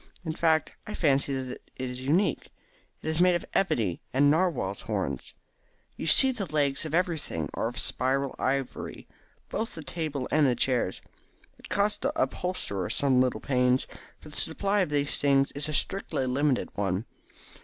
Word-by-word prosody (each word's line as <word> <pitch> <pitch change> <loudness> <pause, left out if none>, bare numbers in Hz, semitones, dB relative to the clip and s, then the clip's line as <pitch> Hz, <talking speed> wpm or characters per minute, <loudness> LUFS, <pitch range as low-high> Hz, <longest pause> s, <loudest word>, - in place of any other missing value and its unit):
In 160 - -2
fact, 160 -1 +1
I 210 - -5
fancy 140 -3 +2
that 130 -1 -5 0.2
it 130 -1 -4
is 125 0 -7
unique. 160 +10 +1 0.5
It - - -6
is 160 +1 -1
made 180 0 +5
of 175 - -2
ebony 110 - +1
and 145 +2 +4
narwhals' 155 - 0
horns. 70 -2 -3 0.6
You - - -5
see 265 - +7
that 215 -7 -4
the - - -15
legs 145 -1 +1
of 155 0 -2
everything 160 - -1
are - - -1
of 120 +2 -6
spiral 135 +1 +1
ivory, 135 0 -2 0.4
both 225 - -3
the 160 - -7
table 150 -5 -3
and 150 -2 +4
the 125 - +2
chairs. 120 -6 +1 0.6
It - - -13
cost 200 +4 +1
the 295 +4 -1
upholsterer 180 - -1
some 130 -3 +3
little 130 -1 0
pains, 125 -1 +2 0.3
for 150 - -13
the 150 - -9
supply 200 +5 +1
of 185 - +1
these 145 -1 +1
things 140 -1 +3
is 145 +2 -2
a - - -3
strictly 190 -8 0
limited 135 +1 +1
one. 100 +1 -1
145 Hz, 175 wpm, -28 LUFS, 130-165 Hz, 0.6 s, see